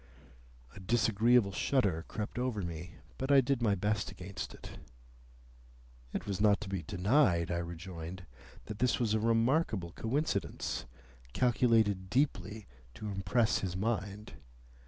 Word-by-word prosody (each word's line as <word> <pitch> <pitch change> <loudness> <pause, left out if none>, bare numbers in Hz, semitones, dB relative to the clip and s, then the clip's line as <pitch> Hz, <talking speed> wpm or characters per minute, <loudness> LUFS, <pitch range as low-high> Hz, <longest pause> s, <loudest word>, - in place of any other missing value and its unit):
A - - -11
disagreeable 115 +1 +3
shudder 95 -7 +1
crept 105 +2 -4
over 125 -6 -1
me, 85 0 -6 0.2
but 135 +2 -1
I 140 - +8
did 135 -1 +1
my 105 -4 +3
best 105 +2 -1
against 95 +2 -7
it. - - -11 1.3
It - - -4
was 100 -1 -2
not 105 -2 +5
to 105 - -6
be 95 -3 -2
denied, 90 - +2
I 85 - 0
rejoined, 85 +1 -7 0.4
that 110 -1 -7
this 125 0 +2
was 115 -4 +1
a 110 - +2
remarkable 115 - +1
coincidence, 135 - -2 0.5
calculated 115 - +2
deeply 110 -5 0 0.3
to 105 - -5
impress 100 +4 +1
his 90 -2 -3
mind. 105 0 -2
105 Hz, 135 wpm, -32 LUFS, 95-120 Hz, 1.3 s, I